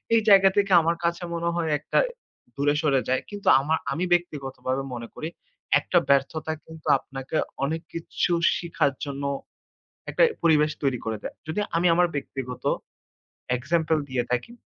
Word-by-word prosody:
এই 225 Hz, -, +5 dB
জায়গা 195 Hz, -1 st, +8 dB
থেকে 200 Hz, -1 st, +2 dB
আমার 170 Hz, +1 st, +1 dB
কাছে 170 Hz, +1 st, 0 dB
মনে 170 Hz, 0 st, -1 dB
হয় 170 Hz, -2 st, -1 dB
একটা -, -, -2 dB, 0.6 s
দূরে 145 Hz, +1 st, +2 dB
সরে 135 Hz, -4 st, +2 dB
যায়। 130 Hz, -, +2 dB
কিন্তু 205 Hz, -1 st, -8 dB
আমা 155 Hz, +4 st, +1 dB, 0.2 s
আমি 165 Hz, +6 st, -1 dB
ব্যক্তিগতভাবে 135 Hz, -5 st, -2 dB
মনে 115 Hz, -1 st, -6 dB
করি 155 Hz, -, -4 dB, 0.5 s
একটা 180 Hz, -, 0 dB
ব্যর্থতা 140 Hz, +3 st, +2 dB
কিন্তু 160 Hz, -1 st, -12 dB
আপনাকে 135 Hz, +3 st, -5 dB, 0.3 s
অনেক 160 Hz, +3 st, -1 dB
কিছু 165 Hz, +1 st, -2 dB, 0.3 s
শিখার 170 Hz, -5 st, 0 dB
জন্য 140 Hz, 0 st, -5 dB, 0.9 s
একটা -, -, +2 dB, 0.2 s
পরিবেশ 155 Hz, -2 st, +4 dB
তৈরি 135 Hz, -3 st, +1 dB
করে 110 Hz, -1 st, -2 dB
দেয়। -, -, -6 dB
যদি 160 Hz, +6 st, -2 dB, 0.2 s
আমি 175 Hz, -, +2 dB
আমার 175 Hz, +1 st, +4 dB
ব্যক্তিগত 135 Hz, -3 st, -5 dB, 0.9 s
example 160 Hz, +3 st, +1 dB
দিয়ে 130 Hz, -2 st, -1 dB
থাকি, 125 Hz, -, -1 dB
155 Hz, 150 wpm, -25 LUFS, 135-170 Hz, 0.9 s, জায়গা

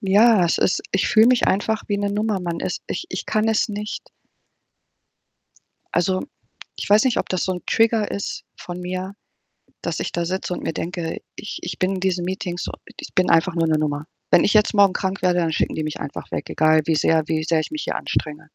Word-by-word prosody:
Ja, 205 Hz, 0 st, +5 dB
es 170 Hz, -, +1 dB
ist -, -, +2 dB
ich 195 Hz, -, +1 dB
fühle 225 Hz, 0 st, +6 dB
mich 250 Hz, -1 st, +3 dB
einfach 215 Hz, +2 st, +1 dB
wie 205 Hz, -, 0 dB
'ne 200 Hz, 0 st, -1 dB
Nummer. 210 Hz, -1 st, 0 dB
Man 170 Hz, -1 st, -3 dB
ist -, -, -3 dB
ich -, -, -4 dB
ich -, -, -4 dB
kann 215 Hz, 0 st, +1 dB
es 225 Hz, +1 st, +2 dB
nicht 210 Hz, 0 st, -5 dB, 1.9 s
Also, 185 Hz, +2 st, +1 dB, 0.6 s
ich -, -, -5 dB
weiß 210 Hz, +1 st, +6 dB
nicht, 255 Hz, -, +2 dB
ob -, -, -1 dB
das 185 Hz, -2 st, 0 dB
so 185 Hz, -, 0 dB
'n 180 Hz, -, -6 dB
Trigger 225 Hz, -1 st, +2 dB
ist 200 Hz, -, -4 dB
von 175 Hz, 0 st, -7 dB
mir, 185 Hz, +2 st, -4 dB, 0.7 s
dass -, -, -3 dB
ich -, -, -3 dB
da 170 Hz, -, -1 dB
sitze 185 Hz, +1 st, -2 dB
und -, -, -6 dB
mir 165 Hz, -, -2 dB
denke: 170 Hz, 0 st, -4 dB, 0.2 s
„Ich 215 Hz, -, -6 dB
ich 175 Hz, -1 st, -5 dB
bin 190 Hz, +1 st, +1 dB
in -, -, -3 dB
diesen 180 Hz, -2 st, 0 dB
Meetings, 180 Hz, -1 st, -3 dB, 0.3 s
ich -, -, -8 dB
bin 185 Hz, -, +3 dB
einfach 165 Hz, +2 st, +3 dB
nur 165 Hz, -1 st, +2 dB
'ne 155 Hz, -, +3 dB
Nummer. 150 Hz, -1 st, -1 dB, 0.3 s
Wenn 175 Hz, -, +6 dB
ich -, -, +2 dB
jetzt 215 Hz, -1 st, +4 dB
morgen 200 Hz, -2 st, +5 dB
krank 190 Hz, 0 st, -2 dB
werde, 180 Hz, -1 st, +3 dB
dann 165 Hz, -2 st, +1 dB
schicken -, -, 0 dB
die 155 Hz, -, -2 dB
mich 155 Hz, 0 st, -4 dB
einfach 140 Hz, -, -7 dB
weg, -, -, -4 dB
egal 155 Hz, 0 st, +4 dB
wie 160 Hz, -, +2 dB
sehr 160 Hz, +1 st, +3 dB
wie 155 Hz, 0 st, 0 dB
sehr 165 Hz, -1 st, +2 dB
ich 155 Hz, -, -4 dB
mich 310 Hz, 0 st, -4 dB
hier -, -, -3 dB
anstrenge.“ 155 Hz, -1 st, -2 dB
185 Hz, 225 wpm, -22 LUFS, 165-205 Hz, 1.9 s, fühle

